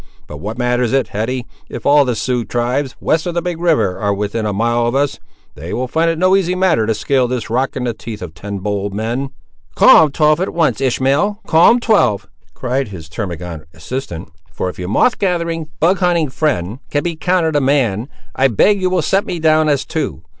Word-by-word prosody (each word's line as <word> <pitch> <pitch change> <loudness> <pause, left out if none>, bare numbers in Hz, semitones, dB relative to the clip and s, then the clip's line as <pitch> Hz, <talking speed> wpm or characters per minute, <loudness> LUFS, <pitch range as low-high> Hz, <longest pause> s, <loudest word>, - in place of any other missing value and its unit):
But 75 - -9
what 105 +9 -6
matters 125 0 0
it, 135 -2 +1
Hetty, 120 +4 -3 0.2
if 120 - -8
all 145 0 +5
the 125 -2 -1
Sioux 120 +2 -1
tribes, 125 +4 -2
west 160 +2 0
of 175 - -3
the 170 - +1
big 175 -2 -4
river, 150 - +1
are 100 -1 0
within 105 +2 -2
a - - -1
mile 120 +3 +1
of 120 - -1
us; 140 0 0 0.3
they 80 +4 -7
will 125 +1 -2
find 165 +5 +1
it 165 - -1
no 185 +3 +4
easy 185 -2 +1
matter 180 -12 +2
to 110 - +1
scale 130 0 +1
this 120 -3 -4
rock, 130 +3 0
in 130 - -3
the 120 -2 -1
teeth 110 -2 -8
of 85 -3 -8
ten 100 +5 -6
bold 100 0 -3
men." 120 +6 -2 0.5
"Call 160 - +7
'em 150 - -4
twelve 150 +2 +3
at 190 - -3
once, 165 -4 +1
Ishmael; 135 - +1
call 160 +2 +5
'em 240 - +4
twelve!" 195 - +2 0.3
cried 130 +1 -2
his 90 -6 -9
termagant 85 -5 -6
assistant. 85 - -6 0.2
"For 95 - -3
if 90 - -10
your 90 0 -4
moth 175 - +2
gathering, 170 -4 -1
bug 180 +4 +3
hunting 175 -5 +1
friend, 130 - -1
can 145 0 -1
be 170 -2 -2
counted 165 -1 0
a 145 - +3
man, 130 -4 +1 0.3
I 135 - +3
beg 195 - +2
you 185 - +1
will 180 -3 0
set 195 +6 +1
me 175 - -3
down 155 -1 +3
as 140 -2 +1
two. 155 - -4
130 Hz, 220 wpm, -17 LUFS, 110-160 Hz, 0.5 s, Call